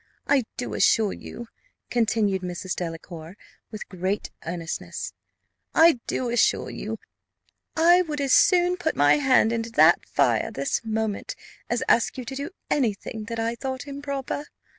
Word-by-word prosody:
I 275 -4 +3
do 245 - -4
assure 215 -3 +3
you," 235 - -9 0.4
continued 220 -5 +1
Mrs. 180 0 -4
Delacour 165 +1 -7 0.3
with 215 - -8
great 190 +2 -3 0.2
earnestness, 170 -1 -5 0.6
"I 325 -5 +6
do 245 -2 -1
assure 240 - +2
you - - -5 0.8
I 345 +3 +6
would 305 -4 -3
as 275 -2 +1
soon 360 -1 +5
put 320 - -1
my 145 - +5
hand 260 -5 +3
into 230 0 -2
that - - +5
fire, - - +2
this 275 - -2
moment, 220 -2 -2 0.3
as 240 +2 0
ask 230 - +3
you 255 - -5
to 270 - -6
do 280 +4 -4 0.2
any 235 -8 +1
thing 215 +2 -7
that 230 0 -5
I 225 +1 0
thought 260 +2 -5
improper. 280 0 -4
235 Hz, 150 wpm, -25 LUFS, 205-280 Hz, 0.8 s, I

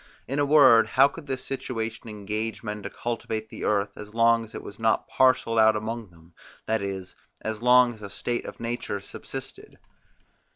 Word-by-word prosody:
In 135 +4 -2
a 145 - +2
word, 130 -7 +7
how 135 +4 +5
could 150 +1 -11
this 130 -1 -3
situation 115 -4 -4
engage 105 +1 -4
men 105 -1 -4
to - - -6
cultivate 110 -2 -4
the - - -8
earth, 100 -1 +1
as 105 +1 -10
long 115 0 +4
as 110 - -11
it - - -6
was 100 - -10
not 110 -1 +1
parcelled 130 -3 +3
out 110 0 +6
among 110 +1 -4
them, 85 0 -21 0.3
that 110 -1 0
is, 95 -2 -5 0.3
as 110 0 -4
long 125 0 +5
as 110 - -16
a 100 - -7
state 120 +4 -2
of - - -9
nature 115 -3 -3
subsisted. 100 - -9
115 Hz, 190 wpm, -26 LUFS, 105-120 Hz, 0.3 s, word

